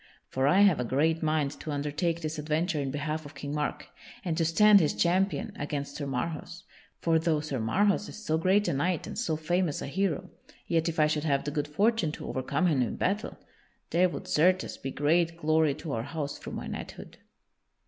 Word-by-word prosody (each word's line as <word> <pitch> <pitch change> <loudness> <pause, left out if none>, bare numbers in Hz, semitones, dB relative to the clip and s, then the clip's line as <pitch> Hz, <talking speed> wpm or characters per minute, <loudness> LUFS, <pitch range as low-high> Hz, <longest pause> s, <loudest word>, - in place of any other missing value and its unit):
For 130 +1 +1
I 185 +7 +5
have 195 -8 +5
a - - +1
great 155 +7 +1
mind 155 -3 +1
to - - -7
undertake 150 +4 -1
this 155 0 -3
adventure 155 +2 0
in 135 - -2
behalf 155 +3 -3
of 145 0 -12
King 140 +1 -5
Mark, 150 0 -2 0.4
and 170 -3 0
to 165 - +1
stand 205 +6 +6
his 155 - +1
champion 195 +4 +1
against 145 -1 -4
Sir 145 - -4
Marhaus. 165 +5 -4 0.4
For 165 -1 +3
though 160 -2 +1
Sir 150 -4 -3
Marhaus 200 - +1
is - - -9
so 160 +1 +1
great 190 +4 +3
a - - +1
knight 170 +4 0
and - - -7
so 170 -10 -1
famous 165 0 0
a - - -4
hero, 175 +1 -1 0.3
yet 165 0 +1
if 165 - -4
I 155 - +6
should 150 0 0
have 140 -3 +1
the 145 - -3
good 145 0 -2
fortune 200 +2 +1
to - - -7
overcome 130 +7 -1
him 150 -7 +3
in 120 - -1
battle, 200 +3 -1 0.5
there 180 +2 +4
would, 185 - -7
certes, 185 +2 +2
be 135 - -6
great 165 +4 +1
glory 155 -2 +2
to 160 - -6
our 115 - -1
house 145 +2 -5
through - - -8
my - - -5
knighthood." - - -8
155 Hz, 210 wpm, -28 LUFS, 145-175 Hz, 0.5 s, stand